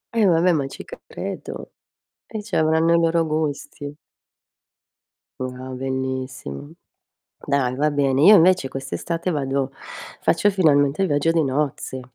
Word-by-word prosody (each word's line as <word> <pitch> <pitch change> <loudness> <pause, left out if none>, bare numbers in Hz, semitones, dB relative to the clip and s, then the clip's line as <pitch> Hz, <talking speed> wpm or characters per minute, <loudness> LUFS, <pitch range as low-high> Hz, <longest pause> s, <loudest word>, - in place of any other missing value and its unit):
E 225 -2 +4
vabbè, 175 +1 +4
ma 145 -5 0
ci - - -10 0.2
credo. - - -7 0.6
Eh, 220 - -6
c'avranno 165 -4 +2
i - - +6
loro 165 0 +2
gusti. 145 -2 -3 1.5
Wow 130 0 -6
bellissimo. 130 - -4 0.8
Dai 135 -3 +1
va 150 +3 +1
bene, 140 -2 +1
io 205 +6 +9
invece 180 -5 +4
quest'estate 165 +6 -4
vado 135 -3 -1 0.5
faccio 205 +5 +2
finalmente 150 -4 +3
il 190 - +1
viaggio 145 +2 +1
di 165 -1 +2
nozze 135 -1 -2
145 Hz, 125 wpm, -22 LUFS, 135-165 Hz, 1.5 s, io